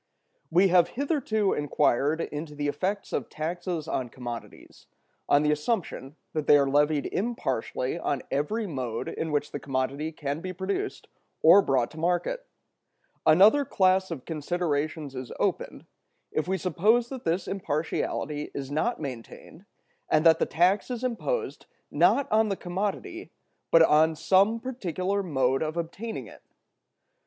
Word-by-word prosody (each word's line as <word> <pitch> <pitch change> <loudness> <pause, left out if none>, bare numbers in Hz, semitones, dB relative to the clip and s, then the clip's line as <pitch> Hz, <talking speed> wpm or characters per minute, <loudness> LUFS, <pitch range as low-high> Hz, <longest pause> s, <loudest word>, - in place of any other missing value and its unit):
We 185 +4 +4
have 175 -1 +5
hitherto 255 -8 +1
inquired 145 +1 +1
into 150 0 -5
the 145 0 -2
effects 190 +8 -2
of - - -2
taxes 170 0 -4
on 130 -6 -2
commodities, 120 -1 -9 0.4
on 145 +1 +5
the 150 - +3
assumption 150 - -2 0.2
that 155 -2 -2
they 145 - +8
are 140 -1 +2
levied 145 +1 +2
impartially 150 - -2
on 140 -5 -2
every 180 +12 -1
mode 130 - -4
in 160 - -4
which 145 0 -1
the 145 - -4
commodity 140 +3 -2
can 150 0 -4
be 185 +1 -5
produced 195 - -3 0.4
or 175 +5 +8
brought 130 -8 +1
to 160 - -10
market. 175 - -1 0.8
Another 200 - +6
class 190 -5 +2
of 155 -7 -6
considerations 155 -2 -2
is 130 -2 -7
opened, - - -2 0.5
if 155 - -1
we 190 +1 0
suppose 210 +7 +2
that 260 -2 -7
this 170 +3 -1
impartiality 155 -3 -2
is 140 -1 -5
not 195 +12 0
maintained, 140 - -8 0.4
and 155 +2 +3
that 165 -1 +6
the - - +1
tax 180 +7 +2
is 245 -1 -4
imposed, 255 - -3 0.2
not 280 - +3
on 215 0 +3
the 195 - 0
commodity, 200 - -4 0.4
but 165 -1 +7
on 160 +1 +4
some 195 +8 +3
particular 200 -6 -2
mode 135 -7 +1
of 155 +1 -2
obtaining 190 +7 -4
it. - - -14
165 Hz, 145 wpm, -27 LUFS, 145-195 Hz, 0.8 s, they